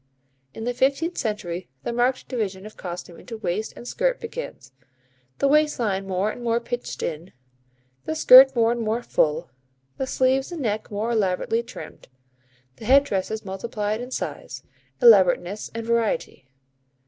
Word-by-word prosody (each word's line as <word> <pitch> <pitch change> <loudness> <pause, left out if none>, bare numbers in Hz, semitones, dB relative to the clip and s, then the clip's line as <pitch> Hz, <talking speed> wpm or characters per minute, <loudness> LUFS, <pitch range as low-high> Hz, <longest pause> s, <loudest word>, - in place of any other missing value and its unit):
In 225 - -6
the 245 +1 -1
fifteenth 275 +7 +1
century, 185 - -3
the 235 - -3
marked 245 +2 0
division 205 -6 -3
of 215 - -11
costume 175 -1 -8
into 230 -2 -8
waist 215 +1 -2
and 240 - -10
skirt - - 0
begins, 455 - -7 0.7
the 280 - +2
waist 300 +1 +3
line 195 -5 -1
more 190 +3 0
and 245 - -9
more 235 0 +1
pinched 245 +1 -5
in, 165 +3 -5 0.7
the 315 - -2
skirt 265 -3 +8
more 230 -1 +3
and 240 0 -2
more 225 +2 -1
full, 150 - 0 0.5
the 265 - -1
sleeves 265 +3 +1
and 330 -5 -5
neck 215 -1 -2
more 215 +3 -2
elaborately 215 +1 0
trimmed, 235 +1 -11 0.7
the 220 - -10
head 275 +4 +6
dresses 220 -2 -3
multiplied 210 +2 -3
in 250 - -6
size, - - -5 0.4
elaborateness 195 -3 +5
and 230 0 -4
variety. 230 - -1
230 Hz, 155 wpm, -24 LUFS, 195-255 Hz, 0.7 s, skirt